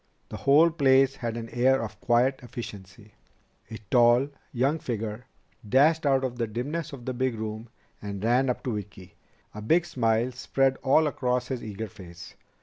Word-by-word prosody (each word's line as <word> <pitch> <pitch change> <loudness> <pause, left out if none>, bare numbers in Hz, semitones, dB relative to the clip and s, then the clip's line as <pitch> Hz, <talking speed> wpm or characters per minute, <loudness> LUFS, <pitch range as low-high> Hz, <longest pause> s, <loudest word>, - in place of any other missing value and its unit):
The - - -6
whole 150 +5 +5
place 135 -3 +3
had 115 -1 -4
an 115 -1 -5
air 130 +3 +2
of 110 -2 -7
quiet 125 +3 +2
efficiency. 105 -3 -10 0.6
A 110 - -7
tall, 120 +2 +4 0.2
young 135 +6 0
figure 115 -2 -5 0.4
dashed 150 +5 +4
out 135 -1 +3
of 125 -2 -3
the 115 -2 -1
dimness 145 +9 -4
of 130 -4 -10
the 130 - -3
big 130 -1 -1
room 110 +1 -6 0.3
and 100 -1 -6
ran 125 +3 +2
up 125 - -2
to 125 - -2
Vicki, 95 -4 -8 0.4
a 105 - -8
big 160 +11 +2
smile 120 -5 0
spread 135 +1 0
all 140 +4 +3
across 125 -3 -1
his 130 -3 -4
eager 110 0 -5
face. 90 -5 -12
120 Hz, 170 wpm, -26 LUFS, 110-135 Hz, 0.6 s, whole